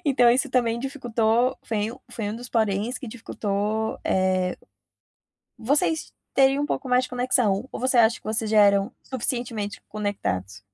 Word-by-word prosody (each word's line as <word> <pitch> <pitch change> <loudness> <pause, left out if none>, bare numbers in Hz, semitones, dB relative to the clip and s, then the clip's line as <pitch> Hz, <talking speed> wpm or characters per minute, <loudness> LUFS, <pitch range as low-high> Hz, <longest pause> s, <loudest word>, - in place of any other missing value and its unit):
Então 250 -5 +5
isso 265 +4 +2
também 235 -2 +1
dificultou, 245 -2 0
foi 215 0 -2
um 255 - -12
foi 210 -3 -3
um 220 - -5
dos 245 +1 -9
poréns 220 +1 0
que 265 - -8
dificultou, 220 -1 -2
eh. 185 -1 +1 1.0
Vocês 290 +6 0 0.2
teriam 270 +1 +4
um - - 0
pouco 270 -2 -3
mais 250 +1 +3
de - - -9
conexão, 245 -4 +1
ou - - -5
você 255 +1 +1
acha 230 0 +5
que - - -33
vocês 215 0 -1
já 220 - +4
eram 200 +1 +4
suficientemente 240 -4 -3
conectados? 100 - -3
225 Hz, 160 wpm, -25 LUFS, 205-250 Hz, 1.0 s, Então